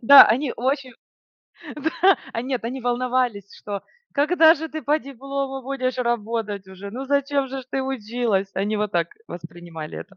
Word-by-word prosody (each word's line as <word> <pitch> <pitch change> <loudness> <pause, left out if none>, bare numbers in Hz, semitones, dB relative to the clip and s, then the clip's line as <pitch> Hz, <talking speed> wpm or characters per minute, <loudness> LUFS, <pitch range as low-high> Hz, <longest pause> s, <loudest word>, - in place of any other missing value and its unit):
да, 280 +4 +11
они 270 0 -2
очень 260 +1 -1 0.8
Да, 320 +6 +3
а, 230 - -2
нет, 255 -2 -2
они 255 +3 -3
волновались, 245 -4 0
что 200 -2 -6 0.3
когда 320 +2 +6
же 320 +1 -5
ты 315 +1 -6
по 295 +4 +2
диплому 275 0 -4
будешь 255 -1 -2
работать 225 -4 -1
уже, 190 +1 -8
ну 255 +6 -5
зачем 280 0 +1
же 265 +1 -4
ж - - -18
ты 265 0 -1
училась? 230 -6 -1
Они 205 +3 0
вот 210 -1 -1
так 170 -1 +1 0.2
воспринимали 170 -2 -8
это. 195 -1 -11
250 Hz, 165 wpm, -23 LUFS, 210-275 Hz, 0.8 s, да